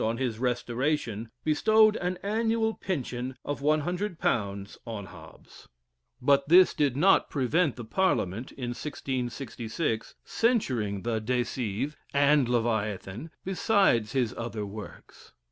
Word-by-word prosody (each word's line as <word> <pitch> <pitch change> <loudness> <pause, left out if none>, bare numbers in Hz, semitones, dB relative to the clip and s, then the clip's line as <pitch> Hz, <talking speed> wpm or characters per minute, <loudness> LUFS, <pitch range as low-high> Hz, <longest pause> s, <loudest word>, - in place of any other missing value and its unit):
on 115 +1 0
his 120 -4 -2
restoration, 120 -2 -1
bestowed 215 +7 +4
an 180 +1 -2
annual 225 +2 +1
pension 130 - -4
of 145 -1 -3
£100 150 - -1
on 110 -4 -5
Hobbes, 85 -5 -14 0.5
but 140 +2 +3
this 180 +2 +7
did 140 -3 +1
not 190 +6 +4
prevent 145 +3 +1
the 120 - -7
parliament, 115 - 0
in 125 -3 -5
1666, 120 -2 -3
censuring 125 - 0
the 115 -2 0
"De 125 +2 +1
Cive" 125 +5 -3 0.2
and 140 -2 +4
"Leviathan," 110 - -1 0.2
besides 190 - +2
his 125 -4 +1
other 115 -3 -4
works. 105 +1 -11
130 Hz, 115 wpm, -28 LUFS, 115-160 Hz, 0.5 s, this